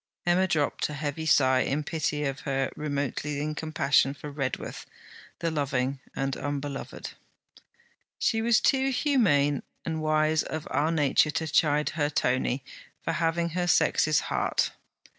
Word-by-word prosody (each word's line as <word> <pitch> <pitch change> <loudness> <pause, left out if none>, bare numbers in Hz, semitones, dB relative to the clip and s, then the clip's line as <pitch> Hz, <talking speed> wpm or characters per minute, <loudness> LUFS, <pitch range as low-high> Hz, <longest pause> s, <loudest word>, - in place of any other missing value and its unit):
Emma 180 +2 +3
dropped 150 -4 0
a 150 - -5
heavy 150 +2 -3
sigh 130 -3 +4
in 145 +3 0
pity 150 -1 -2
of 135 -1 -2
her, 135 -2 -1
remotely 145 0 -2
in 155 +1 -2
compassion 145 -3 +1
for 145 0 -8
Redworth, 135 -2 -4 0.5
the 165 - -1
loving 140 -3 -1 0.2
and 135 0 -1
unbeloved. 145 -1 -5 1.0
She 225 -1 +1
was 230 0 +4
too 270 0 +2
humane 195 - +2 0.2
and 160 -1 -2
wise 155 0 +2
of 155 -1 -5
our 155 +3 +1
nature 150 -1 +3
to 155 +2 -1
chide 150 -1 +2
her 145 -2 -1
Tony 130 -2 0 0.4
for - - -1
having 170 +1 0
her 175 +1 -1
sex's 155 -3 +3
heart. - - 0
150 Hz, 140 wpm, -27 LUFS, 140-160 Hz, 1.0 s, sigh